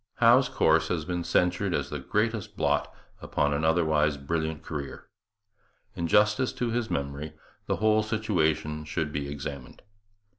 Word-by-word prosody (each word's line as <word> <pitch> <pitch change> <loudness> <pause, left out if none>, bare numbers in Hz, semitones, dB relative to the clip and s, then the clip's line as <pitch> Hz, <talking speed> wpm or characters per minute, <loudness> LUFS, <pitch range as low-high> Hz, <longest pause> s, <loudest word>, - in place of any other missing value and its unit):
Howe's 125 +2 +5
course 80 0 +3
has 80 -3 -2
been 90 0 -2
censured 90 +1 +1
as - - -3
the - - -3
greatest 105 -1 -2
blot - - +1 0.3
upon 75 0 0
an 70 +2 -1
otherwise 80 -3 +2
brilliant 80 +2 -3
career. 70 -3 -6 0.9
In 85 - -2
justice 105 +7 +3
to 120 -2 -2
his 120 -1 -1
memory 70 +2 -3 0.3
the - - +1
whole 110 0 +3
situation 85 -8 0
should 75 0 -3
be 70 -1 -3
examined. 70 -2 -7
80 Hz, 145 wpm, -27 LUFS, 75-105 Hz, 0.9 s, Howe's